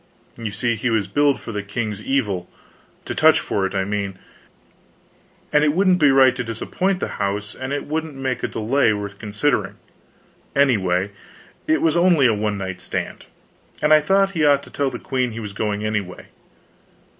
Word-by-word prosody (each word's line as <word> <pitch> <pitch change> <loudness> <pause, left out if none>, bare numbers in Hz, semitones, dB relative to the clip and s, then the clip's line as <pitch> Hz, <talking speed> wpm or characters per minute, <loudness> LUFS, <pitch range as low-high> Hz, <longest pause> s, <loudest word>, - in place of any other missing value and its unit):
You 115 -2 -4
see, 115 +4 -1
he 110 +3 -1
was 110 -3 +1
billed 145 +8 +2
for - - -7
the 105 -2 -3
king's 105 0 -4
evil 105 -9 -1 0.6
to - - -4
touch - - +5
for 95 -1 -1
it, 95 - -8
I 95 - +1
mean 100 -1 -3 1.4
and 150 0 +5
it 150 -1 +3
wouldn't 185 +1 +3
be 150 - +5
right 135 -1 +5
to 125 - -3
disappoint 180 - -2
the - - -2
house 100 +1 -2
and 130 +1 -6
it 145 0 -2
wouldn't 155 0 -3
make 130 -2 -3
a - - -1
delay 115 +1 +1
worth 100 -1 -6
considering, 110 +6 -1 0.8
anyway, 100 -9 +2 0.6
it 155 - +2
was 160 -1 +3
only 170 -5 +4
a 115 - +5
one 105 -1 -1
night 95 -2 -5
stand. - - -5 0.5
And 150 +1 +4
I 155 - +8
thought 195 +5 +2
he 165 -5 -1
ought 140 -1 +4
to - - -14
tell 140 -1 0
the 125 - -6
queen 125 -3 -2
he 115 - -6
was 105 -3 -6
going 105 0 -2
away. 105 -4 -4
115 Hz, 185 wpm, -21 LUFS, 105-145 Hz, 1.4 s, I